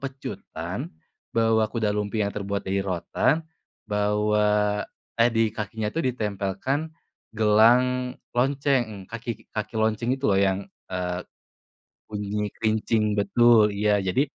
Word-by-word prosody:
pecutan, 135 -1 -6 0.5
bawa 110 -1 +3
kuda 110 -2 0
lumping 105 0 -1
yang 100 - -2
terbuat 100 -1 -3
dari 95 +1 0
rotan, 95 - 0 0.4
bawa 105 0 +1 0.4
eh, 120 - +6
di 115 -1 +2
kakinya 105 0 -3
tuh 165 - -1
ditempelkan 110 +6 -2 0.5
gelang 125 +4 +4 0.2
lonceng, 125 -5 0
kaki 115 0 -5
kaki 110 +1 -4
lonceng 110 +2 +1
itu 135 - -10
loh 100 -1 +4
yang, 95 -1 +2 0.3
eee, 90 -1 -2 0.9
bunyi 105 0 -3
kerincing 110 0 +1
betul, 110 0 +5
iya. 105 0 +2
Jadi 95 +7 +1
105 Hz, 115 wpm, -25 LUFS, 105-115 Hz, 0.9 s, eh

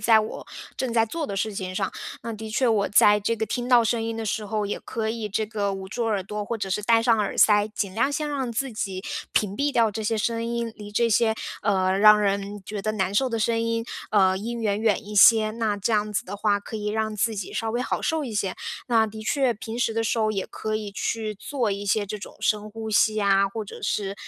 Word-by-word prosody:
在 220 +1 +5
我 215 - -6 0.3
正 260 - -2
在 230 -1 +3
做 310 +7 -4
的 200 - -4
事 215 +2 -1
情 185 -2 -5
上。 - - -1 0.3
那 230 0 -4
的 220 0 -7
确 255 +4 +1
我 215 -4 +2
在 210 0 +5
这 230 +3 0
个 220 - -1
听 245 +3 -3
到 245 -2 +6
声 225 0 0
音 225 0 -3
的 225 - -4
时 210 0 -2
候， 210 +1 -1
也 205 - -3
可 220 -1 -3
以 225 -2 -4
这 215 +2 -1
个 205 -2 -2
捂 190 0 -7
住 230 +4 -3
耳 210 -4 0
朵， 210 +2 -5
或 230 +3 -3
者 195 -3 -4
是 190 - 0
戴 225 +1 +4
上 230 -1 +3
耳 205 -2 -1
塞， 210 -1 +5
尽 200 -3 -2
量 245 +6 +2
先 300 +1 -2
让 275 -4 -2
自 255 +3 -2
己 190 -3 -4 0.3
屏 200 -2 +1
蔽 285 +6 0
掉 230 -5 +3
这 220 +2 -5
些 220 +1 0
声 230 +1 -1
音， 235 0 -2
离 205 -1 -10
这 235 +3 +2
些， 220 0 +3 0.3
呃， 190 -3 +2
让 210 0 +8
人 200 0 -1
觉 205 +1 -5
得 215 +2 -1
难 195 -2 -1
受 260 +5 +3
的 230 -2 -2
声 230 +1 +1
音 230 0 -1 0.3
呃， 190 -3 +4
音 230 +3 -4
源 205 -1 0
远 220 -1 +1
一 210 - -7
些， 215 +1 +7
那 220 -2 -1
这 205 +3 -1
样 210 0 +1
子 210 - -1
的 - - -7
话 205 -1 +2
可 205 - -10
以 210 -1 -4
让 215 0 -1
自 215 +1 0
己 195 - -5
稍 225 - -2
微 240 +2 -1
好 - - -2
受 320 -2 0
一 240 - -5
些。 200 -2 -1 0.3
那 225 -3 +3
的 220 0 -8
确 265 +2 +1
平 225 +1 -7
时 235 -2 +1
的 225 0 0
时 225 +1 0
候 215 -1 +2
也 195 -3 -2
可 215 0 -4
以 215 -1 -3
去 215 +2 -2
做 240 +2 -2
一 200 +1 -3
些 205 +1 +1
这 210 +2 -5
种 205 - -10
深 210 0 0
呼 220 +1 -6
吸 215 0 +3
呀， 200 -1 +3
或 215 +3 -5
者 205 - -10
是 195 -1 -1
215 Hz, 275 characters per minute, -25 LUFS, 205-230 Hz, 0.3 s, 让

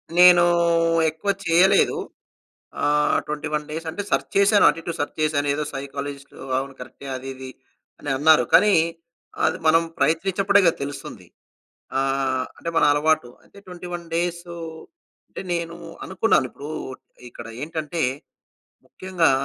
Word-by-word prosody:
నేనూ 175 -1 +8 0.7
ఎక్కువ 180 +6 -2
చేయలేదు. 175 +3 +4 0.8
ఆహ్, 150 0 +2
21 150 0 -3
డేస్ 160 +2 -5
అంటే 200 - -4
సెర్చ్ - - 0
చేశాను 200 +1 +5
అటు, - - +2
ఇటు 170 - -4
సెర్చ్ 145 - -3
చేశాను. 150 -2 +1
ఏదో 150 - -2
సైకాలజిస్ట్ 140 0 -6 0.2
అవును 135 +1 -4
కరెక్టే 140 - -10
అది, 130 +1 -7
ఇది 130 0 -9 0.5
అని 145 - -6
అన్నారు. 150 -2 +5
కానీ, 210 -1 +6 0.7
అది - - +1
మనం 165 +1 +5 0.2
ప్రయత్నించినప్పుడే 195 +6 +2
కదా! 170 - +4
తెలుస్తుంది. 145 0 -8 0.7
ఆహ్, 135 -1 0
అంటే 170 - -4
మన - - +5
అలవాటు 150 -4 +1
అంటే, - - -18
21 175 -1 -7
డేసూ 170 0 -3 0.7
అంటే - - -8
నేనూ 170 0 -3 0.3
అనుకున్నాను. 190 -7 +2
ఇప్పుడు 145 - -10 0.6
ఇక్కడ 115 -1 -10 0.2
ఏంటంటే, 160 +1 -3 0.8
ముఖ్యంగా 185 -3 0
160 Hz, 125 wpm, -23 LUFS, 145-175 Hz, 0.8 s, నేనూ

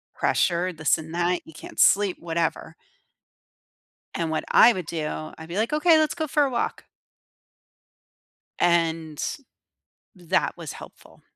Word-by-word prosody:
pressure, 175 +1 +1
this 160 -3 +1
and 160 +1 -9
that. 175 +1 0
You 160 - -14
can't 150 - -11
sleep, 200 -2 +4
whatever. 165 -1 -3 1.4
And 165 -1 -2
what 160 - -2
I 240 - +7
would 185 -6 -5
do, 155 -1 -4
I'd 160 0 -10
be 170 - -6
like, 225 +6 0
"Okay. 315 +2 +5
Let's 310 -1 +1
go 315 -2 -3
for 295 0 +2
a 275 - -1
walk." 240 -2 -3 1.7
And, 165 -3 +1 0.9
that 175 -3 -1
was - - -7
helpful. - - -14
170 Hz, 135 wpm, -24 LUFS, 160-215 Hz, 1.7 s, I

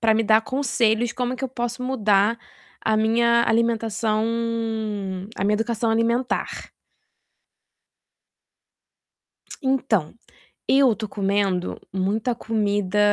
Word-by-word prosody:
para 220 -1 +3
me 225 - +2
dar 220 +1 +4
conselhos 240 -3 +1
como 250 0 -2
é - - -4
que - - -10
eu 265 - -1
posso 240 0 -4
mudar 220 -3 +2 0.4
a 220 -1 +1
minha 235 +2 +3
alimentação 225 -1 +1 1.1
a - - -4
minha 205 +2 +2
educação 225 +1 -1
alimentar. 235 +3 -1 2.9
Então, 260 - 0 0.6
eu 270 -3 +5
estou 215 -1 -5
comendo 195 -2 -1
muita 210 +6 -1
comida 205 -4 -1
225 Hz, 105 wpm, -23 LUFS, 210-240 Hz, 2.9 s, eu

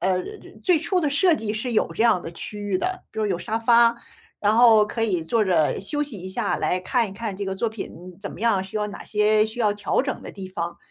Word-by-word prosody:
呃， 185 +1 +1 0.5
最 360 -3 +4
初 340 +4 0
的 305 - +1
设 345 +4 +4
计 215 -1 -3
是 225 +3 -3
有 220 - +1
这 - - +1
样 230 -6 +4
的 165 - -7
区 210 +5 -7
域 205 -2 -1
的， 370 - -3
比 220 - -4
如 215 - +1
有 185 -3 -1
沙 220 +5 -3
发， 235 0 +5 0.5
然 205 0 +3
后 225 -3 +7
可 225 +2 -2
以 185 -6 0
坐 215 +7 +1
着 170 -5 +2
休 290 +9 -2
息 275 -9 -6
一 185 - -6
下， 190 -2 -1
来 180 - 0
看 230 +4 0
一 190 - -9
看 210 -2 -5
这 200 - -4
个 190 0 -3
作 220 +4 -1
品 185 -4 -9
怎 200 - -6
么 - - -11
样， 215 -5 +2
需 190 +3 -7
要 210 0 -1
哪 205 - -9
些 215 0 +3
需 220 +2 -7
要 210 -3 +3
调 205 +4 0
整 270 -1 -3
的 - - -8
地 195 -2 -8
方。 170 -2 -4
210 Hz, 280 characters per minute, -24 LUFS, 190-235 Hz, 0.5 s, 后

